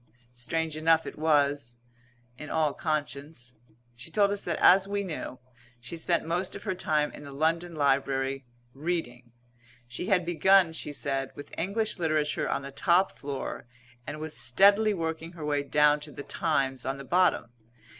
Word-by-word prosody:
Strange 155 +6 -2
enough 160 +1 +3
it - - -7
was 145 -5 +1 0.6
in 150 +4 -9
all 155 -3 +1
conscience. 145 -4 -4 0.4
She 120 +5 -7
told 200 +4 +2
us 200 0 -1
that, 170 - -1
as 190 +1 +6
we 200 0 -2
knew, 160 -7 -5 0.4
she 120 +7 -8
spent 170 0 0
most 175 +3 -2
of - - -8
her 190 - -1
time 155 -5 0
in - - -11
the 140 - -9
London 165 +4 0
Library, 135 -1 0 0.3
reading. 135 -6 -4 0.6
She 120 +9 -5
had 180 -3 +2
begun, 175 +1 +4
she 155 - -5
said, 135 -2 -2
with 145 - -11
English 200 +3 -1
literature 155 -3 0
on - - -1
the 140 - -7
top 180 +6 +2
floor; 140 -3 -5 0.4
and 155 - -5
was 155 0 -3
steadily 200 - +4
working 165 0 -4
her 160 -3 -7
way 145 -1 +1
down 150 +1 +3
to 150 0 -9
the 145 - -8
Times 135 -8 -1
on 135 +1 -3
the 140 - -8
bottom. 180 -7 +2
155 Hz, 165 wpm, -28 LUFS, 140-175 Hz, 0.6 s, as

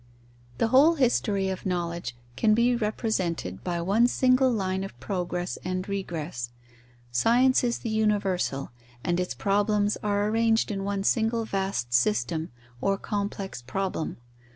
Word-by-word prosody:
The 225 - +1
whole 290 +7 +6
history 215 -8 +1
of 190 - -4
knowledge 170 -7 -2 0.2
can 215 -1 +3
be 240 +2 +3
represented 190 - -2
by 175 -1 -2
one 205 +7 +3
single 255 +1 +3
line 190 -4 -1
of 195 -11 -8
progress 180 +1 -3
and 185 +1 -3
regress. 165 -10 -4 0.6
Science 245 - +4
is 240 -1 +1
the 230 - -5
universal, 200 -10 0 0.3
and 175 0 0
its 180 - -2
problems 205 +1 +1
are 205 0 +1
arranged 225 0 +2
in 195 -1 -3
one 200 0 -2
single 225 +2 +1
vast 190 - -2
system, 120 +7 +1 0.3
or 195 0 +1
complex 200 - -4
problem. 170 +6 -3
195 Hz, 135 wpm, -27 LUFS, 175-220 Hz, 0.6 s, whole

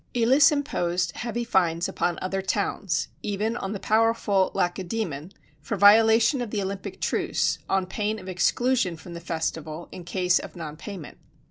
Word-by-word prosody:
Elis 260 +5 +5
imposed 180 -12 -1
heavy 235 0 -3
fines 170 -6 +1
upon 175 -2 -1
other 195 +1 -2
towns 195 -2 -1
even 210 +3 -2
on 195 -4 -4
the 205 - -4
powerful 215 -3 +2
Lacedæmon 175 -3 -2 0.3
for 155 +7 -3
violation 225 +5 +6
of 240 - -3
the 210 - -2
Olympic 195 0 -5
truce, - - 0
on 190 -1 +1
pain 210 +3 -2
of 185 - -11
exclusion 190 +1 +1
from 170 +2 -11
the 170 - -6
festival 160 -1 -4
in 180 - -9
case 180 +1 +1
of - - -9
non 155 -3 -6
payment. 175 -1 -9
195 Hz, 155 wpm, -25 LUFS, 175-225 Hz, 0.3 s, violation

